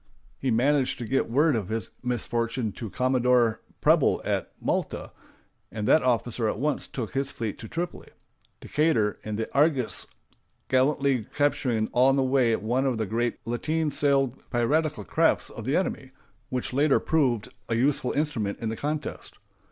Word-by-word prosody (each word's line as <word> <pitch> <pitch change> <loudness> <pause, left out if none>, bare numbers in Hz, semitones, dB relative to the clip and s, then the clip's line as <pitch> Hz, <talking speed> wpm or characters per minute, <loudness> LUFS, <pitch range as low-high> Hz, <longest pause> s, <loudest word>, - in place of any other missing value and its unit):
He 135 - -1
managed 130 +3 +2
to 120 - -5
get 135 +2 0
word 145 +4 +3
of 105 -5 -3
his 110 0 -3
misfortune 120 -2 -1
to 110 +2 -7
Commodore 125 -1 +2 0.2
Preble - - +4
at - - -1
Malta, - - -2 0.6
and 105 -1 -3
that 160 - +5
officer 120 -2 0
at - - -3
once 150 +5 -1
took 120 -5 -5
his 135 0 -1
fleet 115 -7 -5
to 110 - -8
Tripoli—Decatur, 155 -6 -3
in 110 -1 -4
the 110 +1 -2
Argus, 140 - +3 0.6
gallantly 130 -2 +2
capturing 130 -6 +1
on 130 +2 +4
the 135 - +2
way 130 -3 +3
one 125 +6 0
of 125 -3 0
the 110 - -1
great 115 +4 -1
lateen 150 +7 -1
sailed 135 -3 +2
piratical 150 +6 0
crafts 165 0 +1
of 115 - -8
the 135 +4 +1
enemy, 160 -7 -2 0.4
which 125 0 -3
later 140 +2 +3
proved 130 -9 +1 0.2
a 115 - +1
useful 130 +1 +1
instrument 125 -9 -1
in 115 - -3
the 110 - -3
contest. 150 +4 -4
125 Hz, 155 wpm, -26 LUFS, 115-145 Hz, 0.6 s, that